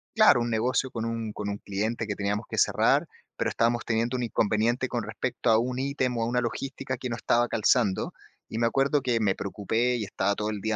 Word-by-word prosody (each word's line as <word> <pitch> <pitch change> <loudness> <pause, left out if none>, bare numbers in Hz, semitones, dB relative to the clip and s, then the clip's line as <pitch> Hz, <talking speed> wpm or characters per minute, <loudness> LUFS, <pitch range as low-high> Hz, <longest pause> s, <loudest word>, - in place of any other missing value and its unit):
claro, 215 - +6
un 120 - -1
negocio 125 +4 +1
con 115 -1 -3
un 115 -2 -3
con 105 0 -5
un 100 - -3
cliente 110 +3 -2
que 105 - -2
teníamos 105 +2 -2
que - - -5
cerrar, - - +3 0.3
pero - - 0
estábamos 120 0 +1
teniendo 120 +2 0
un 125 - -2
inconveniente 115 +3 +1
con 120 -3 -2
respecto 110 +2 -2
a 110 - +6
un 125 +1 -2
ítem, 130 -3 -1
o 115 - 0
a - - 0
una 125 +1 +1
logística 130 +2 -4
que 125 0 -5
no 115 - -2
estaba 120 +1 +2
calzando. 110 -3 +1 0.4
Y 110 - -3
me 115 - +2
acuerdo 135 +4 +2
que 120 -3 +1
me 100 -3 +2
preocupé 110 +5 -1
y 115 - -2
estaba 100 +1 0
todo 105 0 -2
el 105 -2 -3
día 110 +1 -1
115 Hz, 230 wpm, -27 LUFS, 110-125 Hz, 0.4 s, claro